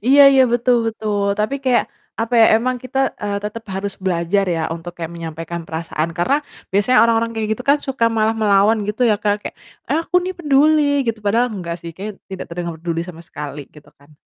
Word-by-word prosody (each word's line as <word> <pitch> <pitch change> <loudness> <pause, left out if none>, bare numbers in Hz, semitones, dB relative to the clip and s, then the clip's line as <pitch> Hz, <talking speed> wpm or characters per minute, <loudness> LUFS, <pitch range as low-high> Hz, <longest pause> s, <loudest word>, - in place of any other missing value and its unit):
Iya 285 +2 +8
iya, 265 -1 +6
betul 240 +1 +3
betul, 215 -2 -2 0.2
tapi 215 +6 0
kayak 250 -2 +3 0.4
apa 230 +2 -1
ya, 225 - +8
emang 250 +2 -1
kita, 255 +1 -4 0.2
eee, 205 -1 -1
tetep 220 +2 -5
harus 195 +1 -3
belajar 180 +2 +1
ya, 165 -2 -1
untuk 170 +1 -8
kayak 170 0 -5
menyampaikan 165 +1 -6
perasaan 160 0 -3
karena, 265 +12 +2 0.4
biasanya 205 +6 +3
orang-orang 230 0 +2
kayak 220 -1 -2
gitu 250 - -7
kan 285 +1 +4
suka 265 -3 -1
malah 220 0 +1
melawan 210 0 +4
gitu 215 +4 -1
ya, 210 - +3
Kak. 205 0 0
Kayak, - - -6 0.3
"Aku 330 +3 -2
nih 365 +1 -4
peduli," 300 -1 +3 0.2
gitu 225 -1 -1
padahal 230 +5 +2
enggak 170 -3 -5
sih 170 -1 -7
kayaknya 205 +1 -7
tidak 190 -1 -6
terdengar 170 -1 -5
peduli 165 0 -3
sama 165 -2 -9
sekali 145 -1 -7
gitu 150 -1 -17
kan. 145 +2 -22
205 Hz, 200 wpm, -19 LUFS, 170-240 Hz, 0.4 s, Iya